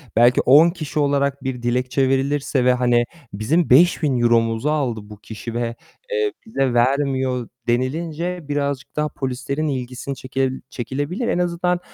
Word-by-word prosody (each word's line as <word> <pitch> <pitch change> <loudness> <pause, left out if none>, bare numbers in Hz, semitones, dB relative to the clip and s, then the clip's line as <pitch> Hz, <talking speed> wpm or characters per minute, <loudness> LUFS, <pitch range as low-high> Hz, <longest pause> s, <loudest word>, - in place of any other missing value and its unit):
belki 120 +2 +5
10 150 +6 +6
kişi 155 -3 -4
olarak 140 -1 +1
bir 130 -2 -3
dilekçe 125 +2 +1
verilirse 135 -1 0
ve 125 - +5
hani 120 -1 +2 0.3
"Bizim 140 - +1
€5000'muzu 120 -5 +3
aldı 135 -7 0
bu 105 0 -12
kişi 110 +2 -7
ve, 115 0 -2 0.4
eee, 435 -3 0
bize 135 - 0
vermiyor." 130 -1 +1 0.2
denilince 160 +8 -1
birazcık 140 -2 -2
daha 150 0 0
polislerin 135 +3 -3
ilgisini 130 0 -4
çekel 130 0 -2
çekilebilir. 145 - -3
En 210 - 0
azından 180 0 0
135 Hz, 135 wpm, -21 LUFS, 125-150 Hz, 0.4 s, 10